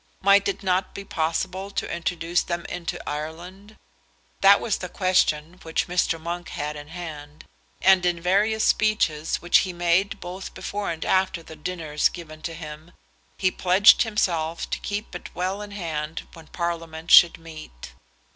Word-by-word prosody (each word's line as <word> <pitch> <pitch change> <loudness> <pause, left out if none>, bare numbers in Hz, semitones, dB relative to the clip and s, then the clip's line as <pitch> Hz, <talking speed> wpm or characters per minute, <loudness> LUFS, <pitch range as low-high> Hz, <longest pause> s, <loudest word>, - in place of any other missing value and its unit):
Might 200 +1 +5
it 200 0 -3
not 185 0 0
be 200 - -7
possible 185 +3 -2
to 200 - -3
introduce 170 0 -1
them 170 -1 -4
into 175 -1 -5
Ireland? 175 +8 -7 0.6
That 200 +1 +7
was 220 - -1
the 180 - -6
question 180 -3 +1
which 160 0 -2
Mr. 175 -2 0
Monk 170 +1 -5
had 150 +1 -4
in 145 0 -9
hand; 155 -3 -9 0.4
and 190 -1 +6
in 175 -1 +1
various 205 +5 +2
speeches 165 -8 +1
which 175 - +5
he 185 - -2
made 175 +3 +1
both 185 +2 -8
before 205 0 -4
and 165 -1 -4
after 185 -3 +1
the 160 - -11
dinners 155 -2 -1
given 155 -3 -10
to 165 +1 -5
him, 155 +1 -10 0.4
he 185 -1 +2
pledged 185 +3 +5
himself 170 -7 0
to - - -1
keep 205 +1 -5
it - - -7
well 185 +3 -2
in 210 - -7
hand 160 -5 -5
when 165 -2 -13
Parliament 165 -2 -4
should 170 - +8
meet. 155 - -11
175 Hz, 160 wpm, -24 LUFS, 160-190 Hz, 0.6 s, should